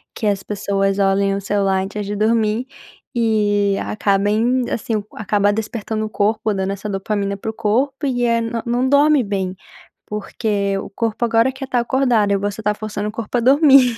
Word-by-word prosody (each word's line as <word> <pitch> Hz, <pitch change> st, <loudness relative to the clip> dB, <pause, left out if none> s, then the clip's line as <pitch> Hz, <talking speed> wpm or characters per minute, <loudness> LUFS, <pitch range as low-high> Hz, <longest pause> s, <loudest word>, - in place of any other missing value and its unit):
que 225 Hz, -, -4 dB
as 200 Hz, -2 st, +1 dB
pessoas 195 Hz, -1 st, -1 dB
olhem 195 Hz, 0 st, +2 dB
o 200 Hz, -, -3 dB
celular 195 Hz, -1 st, +1 dB
antes 205 Hz, +2 st, -4 dB
de 205 Hz, +1 st, -4 dB
dormir 220 Hz, +2 st, +1 dB, 0.5 s
e 205 Hz, -4 st, +2 dB
acabem, 210 Hz, +5 st, +1 dB
assim, 225 Hz, +1 st, -2 dB, 0.2 s
acaba 205 Hz, -1 st, +1 dB
despertando 220 Hz, 0 st, -3 dB
o -, -, -5 dB
corpo, 215 Hz, +1 st, 0 dB
dando 190 Hz, -1 st, -1 dB
essa 200 Hz, +2 st, -6 dB
dopamina 200 Hz, 0 st, -2 dB
para 220 Hz, +3 st, -4 dB
o -, -, -20 dB
corpo 265 Hz, +7 st, 0 dB
e 245 Hz, -2 st, 0 dB
é 230 Hz, -1 st, +2 dB, 0.2 s
não 245 Hz, +2 st, +1 dB
dorme 285 Hz, 0 st, +4 dB
bem. 190 Hz, -3 st, -2 dB, 0.5 s
Porque 205 Hz, -1 st, -2 dB
o -, -, -7 dB
corpo 225 Hz, +2 st, -2 dB
agora 230 Hz, +2 st, +3 dB
quer 265 Hz, +1 st, -7 dB
estar 255 Hz, -2 st, 0 dB
acordado 240 Hz, -4 st, +2 dB
e 200 Hz, -, +3 dB
você 205 Hz, +1 st, -3 dB
está 210 Hz, -1 st, +1 dB
forçando 210 Hz, 0 st, -4 dB
o -, -, -6 dB
corpo 230 Hz, +2 st, -3 dB
a -, -, +1 dB
dormir. 270 Hz, -2 st, +5 dB
215 Hz, 180 wpm, -19 LUFS, 200-235 Hz, 0.5 s, dormir